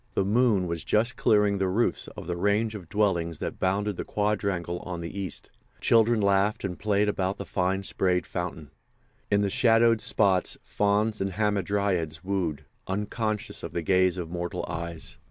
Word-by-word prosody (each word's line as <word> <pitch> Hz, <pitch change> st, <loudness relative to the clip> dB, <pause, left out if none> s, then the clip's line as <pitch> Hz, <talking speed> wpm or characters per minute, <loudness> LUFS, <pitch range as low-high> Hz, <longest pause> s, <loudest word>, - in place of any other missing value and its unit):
The 95 Hz, -, +2 dB
moon 105 Hz, -2 st, +3 dB
was 85 Hz, -2 st, -3 dB
just 115 Hz, +3 st, +1 dB
clearing 105 Hz, -2 st, +3 dB
the 95 Hz, -, +1 dB
roofs 105 Hz, +6 st, 0 dB
of -, -, -7 dB
the 85 Hz, +1 st, -2 dB
range 105 Hz, +5 st, +1 dB
of 95 Hz, -6 st, -9 dB
dwellings 85 Hz, -6 st, 0 dB
that -, -, -5 dB
bounded 100 Hz, +1 st, 0 dB
the -, -, -3 dB
quadrangle 100 Hz, -4 st, -1 dB
on 90 Hz, -2 st, -6 dB
the 85 Hz, +2 st, -6 dB
east. 95 Hz, -5 st, -5 dB, 0.3 s
Children 115 Hz, 0 st, +4 dB
laughed 100 Hz, +1 st, +2 dB
and 90 Hz, -3 st, -4 dB
played 105 Hz, 0 st, +2 dB
about 95 Hz, -1 st, -1 dB
the 100 Hz, -, -6 dB
fine 95 Hz, +1 st, -1 dB
sprayed 90 Hz, -1 st, 0 dB
fountain. 85 Hz, -5 st, -5 dB, 0.6 s
In 100 Hz, 0 st, +3 dB
the 100 Hz, -, +1 dB
shadowed 115 Hz, 0 st, +4 dB
spots 95 Hz, -4 st, +2 dB
fauns 105 Hz, +1 st, 0 dB
and 95 Hz, -1 st, -1 dB
hamadryads 100 Hz, -5 st, 0 dB
wooed, 90 Hz, -6 st, -2 dB, 0.2 s
unconscious 105 Hz, +2 st, -2 dB
of -, -, -7 dB
the 85 Hz, -, -2 dB
gaze 95 Hz, +1 st, +3 dB
of 85 Hz, -2 st, -4 dB
mortal 85 Hz, 0 st, -3 dB
eyes. 85 Hz, -1 st, -4 dB
100 Hz, 170 wpm, -27 LUFS, 90-105 Hz, 0.6 s, Children